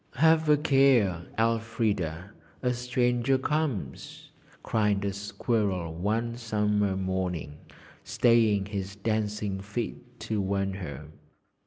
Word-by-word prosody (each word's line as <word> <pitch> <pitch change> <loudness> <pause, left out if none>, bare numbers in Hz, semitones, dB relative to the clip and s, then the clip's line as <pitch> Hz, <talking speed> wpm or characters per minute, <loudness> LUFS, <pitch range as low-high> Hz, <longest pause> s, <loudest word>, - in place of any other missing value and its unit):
'Have 160 +2 +4
a 150 - +6
care, 130 - +3
Elfrida 110 -6 0 0.3
a 125 0 +2
stranger 125 +1 +1
comes!' 130 - -3 0.3
cried 105 -2 +1
a 100 - -1
squirrel 100 -4 -1
one 110 +7 -1
summer 105 -4 0
morning, 90 -6 -3 0.4
staying 110 -4 +3
his 100 -1 -5
dancing 105 -2 -2
feet 120 +4 -6
to 110 -2 -1
warn 95 0 -1
her. 90 -5 -7
105 Hz, 105 wpm, -28 LUFS, 95-120 Hz, 0.4 s, a